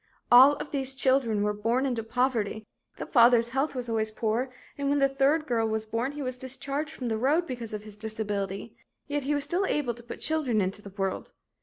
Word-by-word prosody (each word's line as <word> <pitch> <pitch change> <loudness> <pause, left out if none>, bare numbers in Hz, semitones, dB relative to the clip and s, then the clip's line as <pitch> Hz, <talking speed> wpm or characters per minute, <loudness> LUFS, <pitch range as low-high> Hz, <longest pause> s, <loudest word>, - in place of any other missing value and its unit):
"All 260 +4 +9
of - - -7
these 270 -2 0
children 260 -6 +2
were 210 0 +1
born 230 +6 0
into 245 -4 -1
poverty; 225 -2 -1 0.3
the - - -5
father's 235 -2 +5
health 270 +3 -1
was 250 -1 -3
always 220 -1 0
poor, 225 +4 -1 0.3
and 280 -1 -2
when 285 - +2
the 275 -1 +4
third 275 +3 +2
girl 230 -5 +1
was 220 0 -2
born 230 +5 -2
he 290 -1 -5
was 255 -1 -4
discharged 275 +3 -4
from 260 -5 -6
the 220 -1 -1
road 300 +8 +2
because 240 -7 -6
of 210 -1 -5
his 210 -1 -11
disability, 210 -3 -4 0.3
yet 290 -1 -2
he 295 +1 +1
was 285 - 0
still 355 +7 0
able 280 -5 0
to 235 - -13
put 235 - -9
children 300 -8 0
into 195 +1 -1
the 200 - -10
world. 195 -1 -4
245 Hz, 215 wpm, -28 LUFS, 220-275 Hz, 0.3 s, All